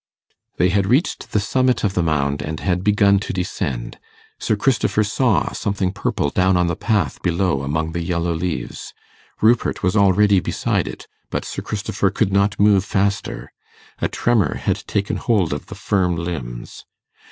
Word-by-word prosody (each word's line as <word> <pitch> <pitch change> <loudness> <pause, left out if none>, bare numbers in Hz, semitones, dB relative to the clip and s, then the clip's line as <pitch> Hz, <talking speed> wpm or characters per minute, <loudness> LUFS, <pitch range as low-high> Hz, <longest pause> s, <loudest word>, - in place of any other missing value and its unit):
They 90 - +3
had 100 0 +1
reached 135 - 0
the 105 - +2
summit 130 +5 +1
of 100 -3 +1
the 90 - +1
mound, 70 -3 0
and 80 0 -4
had 90 -1 -1
begun 100 -1 +4
to - - -4
descend. 65 -9 -3 0.4
Sir - - 0
Christopher 110 -1 +1
saw 105 - +1
something 100 -2 -1
purple 95 -6 -1
down 95 0 +3
on 90 - +3
the 85 -1 -1
path 105 0 -1
below 85 -4 0
among 80 +3 -2
the 85 +1 -3
yellow 85 0 -1
leaves. 85 +1 -4 0.5
Rupert 115 +2 +2
was 90 +2 +1
already 100 0 +4
beside - - -1
it, - - -8 0.2
but - - -3
Sir - - -5
Christopher - - -1
could 95 - 0
not 100 +1 +2
move 100 -2 +5
faster. 100 -10 -2 0.5
A - - +1
tremor 120 -4 +1
had - - -1
taken 100 -1 -1
hold 100 -10 +1
of 75 - -6
the - - -8
firm 90 -4 0
limbs. 70 -9 -6
95 Hz, 165 wpm, -20 LUFS, 85-105 Hz, 0.5 s, move